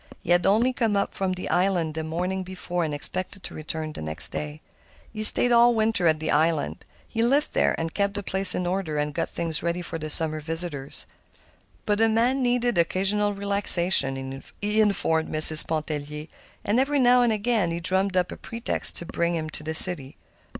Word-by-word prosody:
He 175 - -4
had 175 +1 +2
only 230 +6 +1
come 225 -4 -1
up 200 - -2
from 190 -1 -3
the 185 - -7
island 180 -4 -1
the 160 0 -5
morning 180 +4 -4
before, 180 -1 -5
and 155 - -4
expected 185 +6 -5
to - - -9
return 155 0 -7
next 80 0 -1
day. 75 0 -7 0.5
He 215 - -6
stayed 245 +3 +4
all 235 0 +4
winter 220 -5 +1
at 155 -1 +1
the 155 0 -4
island; 160 0 -1 0.2
he 225 - -4
lived 275 +6 0
there, - - 0
and 165 0 -5
kept 200 0 -2
the 205 - -5
place 190 0 +3
in 180 - -3
order 175 -4 -3
and 150 0 -3
got - - -3
things 165 -2 -2
ready 170 +1 -4
for 165 - -6
the 155 0 -7
summer 155 0 +2
visitors. 160 -3 0 0.8
But 210 0 -1
a 225 - +3
man 240 +5 0
needed 245 -4 -1
occasional 200 +4 0
relaxation, 170 -9 +2 0.2
he 210 +1 0
informed 165 -6 -1
Mrs. 155 0 +8
Pontellier, 150 -1 -5 0.4
and 210 +4 0
every 285 +2 0
now 250 -1 +3
and 240 -2 +1
again 215 -3 -1
he 165 0 -4
drummed 190 +2 -1
up 180 -1 -1
a - - -9
pretext 230 0 -3
to 170 - -3
bring 170 +1 -3
him 155 -1 -5
to - - -1
the 160 +1 -5
city. 160 -6 +5
180 Hz, 195 wpm, -23 LUFS, 160-210 Hz, 0.8 s, Mrs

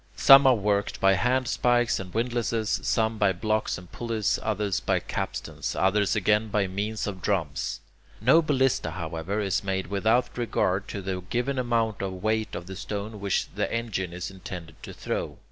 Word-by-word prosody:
Some 135 0 +8
are 130 - +6
worked 100 -1 0
by 95 0 +5
handspikes 120 +1 +2
and 95 -1 -7
windlasses, 115 -1 0
some 110 -1 0
by 100 -2 +3
blocks 110 +3 -1
and 90 -1 -13
pulleys, 115 -3 -1
others 105 -3 -1
by - - +1
capstans, - - -4
others 100 +2 +2
again 105 +2 +2
by 105 -1 +1
means 105 +3 -3
of 95 -3 -5
drums. 85 -8 -1 0.4
No 135 +10 +5
ballista, 135 - +1
however, 85 +3 -4
is 100 -1 0
made 95 -2 -1
without 110 +5 +2
regard 95 -4 0
to 100 - -5
the 95 -1 -3
given 130 +2 -1
amount 115 -4 0
of 95 -1 -3
weight 110 +3 -1
of 85 - -6
the 95 +1 -8
stone 105 +2 -5
which 100 -1 -1
the - - -2
engine 110 -6 -2
is 90 +2 -5
intended 90 -4 -9
to - - -8
throw. - - -4
105 Hz, 170 wpm, -26 LUFS, 95-115 Hz, 0.4 s, Some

